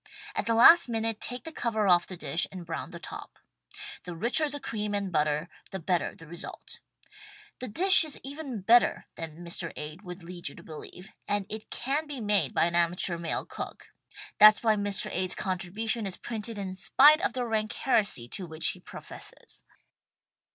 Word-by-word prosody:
At - - -3
the 230 - +2
last 290 +6 +7
minute 225 -1 -2
take 245 0 -5
the 325 - -7
cover 220 -7 -1
off 175 -2 +4
the 185 - -8
dish 170 - 0
and 185 -3 -9
brown 165 -1 -5
the 170 - -9
top. - - -9 0.7
The 175 -1 -7
richer 245 - +2
the 290 0 -7
cream 210 -5 -4
and 200 -2 -3
butter 150 0 0 0.2
the 190 - -5
better 180 0 -1
the 165 - -14
result. 170 +2 -8 0.8
The 255 - -5
dish 370 - +8
is' 310 -3 -4
even 275 -5 -6
better 235 +6 +3
than 165 +1 -9
Mr. 170 0 -4
Ade 150 +4 -8
would 180 -2 -10
lead 175 -2 -5
you - - -14
to - - -13
believe, 180 +5 -11 0.2
and 205 -1 -1
it 215 0 -8
can 280 +5 -2
be 285 -3 -6
made 205 - +1
by - - +2
an 170 - -2
amateur 170 0 +2
male 170 -1 -3
cook - - -8 0.2
— 420 +1 -15
that's 215 +1 +8
why 220 -2 +3
Mr. 205 -1 -1
Ade's 185 0 -1
contribution 200 +4 -2
is 185 - -3
printed 225 -1 -5
in 195 -2 -5
spite 290 - +5
of 400 - 0
the 250 -1 -2
rank 220 -1 -1
heresy 210 - 0
to 185 +6 -6
which 160 0 -1
he - - -5
professes. - - -9
205 Hz, 190 wpm, -28 LUFS, 175-235 Hz, 0.8 s, dish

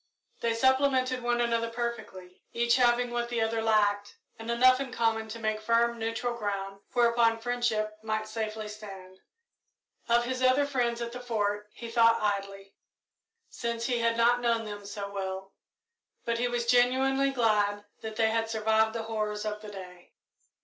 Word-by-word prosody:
They 230 -1 0
supplemented 260 0 +2
one 240 0 0
another 230 -1 0
perfectly, 220 -6 -6
each 235 +1 +2
having 245 -1 +3
what 240 0 -2
the 240 -1 -1
other 225 0 0
lacked, 205 -2 +1 0.2
and 225 +1 -7
enough 255 +2 +5
in 270 -2 -4
common 225 -2 0
to 220 +1 -7
make 215 -1 -2
firm 235 +1 +2
neutral 230 +2 -2
ground 195 -3 -4
whereupon 235 -1 +3
friendship 225 -3 -1
might 215 0 -2
safely 215 -1 -4
stand. 195 -3 -10 0.9
Of 240 0 +3
his 255 +1 -3
other 255 +3 +4
friends 240 -4 -1
at 235 - -5
the 250 - -7
Fort 210 -3 -2
he 235 - -9
thought 230 0 +4
idly, 195 -1 -3 0.7
since 235 0 -4
he 245 -2 0
had 230 0 +1
not 240 +1 +3
known 230 -2 +1
them 205 -1 -7
so 200 0 -5
well, 195 0 -5 0.7
but 235 0 -1
he 245 - +1
was 240 -1 -2
genuinely 260 +3 +3
glad 210 -5 +1 0.2
that 220 -1 -6
they 220 0 +2
had 225 0 0
survived 220 0 +1
the 230 - -2
horrors 215 -1 -3
of 210 0 -4
the 215 - -9
day. 180 -3 -11
230 Hz, 165 wpm, -29 LUFS, 210-240 Hz, 0.9 s, enough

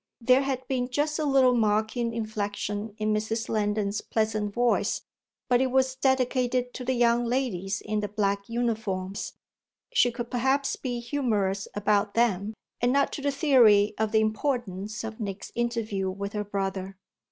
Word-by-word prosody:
There 255 +2 +4
had 260 -2 -3
been 250 -2 -1
just 300 +4 0
a 310 - 0
little 265 -3 +4
mocking 220 +1 +1
inflexion 210 -1 -3
in 215 0 0
Mrs. 220 +1 -1
Lendon's 210 -1 0
pleasant 215 -2 -1
voice; 240 +3 +1 0.4
but 245 0 +3
it 260 - +2
was 260 0 +2
dedicated 255 -1 +1
to 255 - -6
the 260 +1 0
young 240 0 +3
ladies 225 -6 -1
in 215 0 -2
the 210 - -2
black 200 -1 -1
uniforms 220 -5 -2 0.6
she 245 - +4
could 235 0 -6
perhaps 265 +3 +1
be 245 -2 -4
humorous 215 -7 -1
about 205 0 +1
them 215 -2 +1 0.3
and 245 +1 +3
not 280 +1 +2
to - - -4
the 285 - +1
theory 240 -8 +5
of 220 -1 +1
the 220 0 +4
"importance" 215 -3 -2
of 225 0 -6
Nick's 200 -2 -5
interview 225 -5 -1
with 200 +2 -5
her 210 -1 -2
brother. 195 -1 -3
225 Hz, 160 wpm, -27 LUFS, 205-250 Hz, 0.6 s, theory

